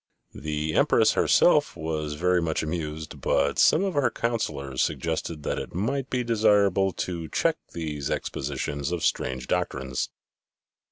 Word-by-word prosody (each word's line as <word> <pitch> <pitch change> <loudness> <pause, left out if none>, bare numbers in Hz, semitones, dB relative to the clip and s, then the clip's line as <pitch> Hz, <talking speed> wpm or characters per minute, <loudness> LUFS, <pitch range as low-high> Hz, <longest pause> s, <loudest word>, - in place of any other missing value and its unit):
The 75 0 -3
Empress - - +4
herself - - +4
was 80 -2 -3
very 90 +2 +2
much 80 -2 -1
amused, 80 -1 -5
but - - +1
some 170 - +5
of 195 -2 -1
her 145 -3 +2
councillors 70 - -2
suggested 80 -3 -2
that - - -1
it - - -7
might 130 +8 -1
be 125 -1 0
desirable 105 -4 +3
to 85 -3 -5
check - - +1 0.2
these 75 -4 -4
expositions 70 +2 -3
of 90 -2 -1
strange 65 0 -1
doctrines. 65 0 -2
80 Hz, 135 wpm, -26 LUFS, 75-100 Hz, 0.2 s, some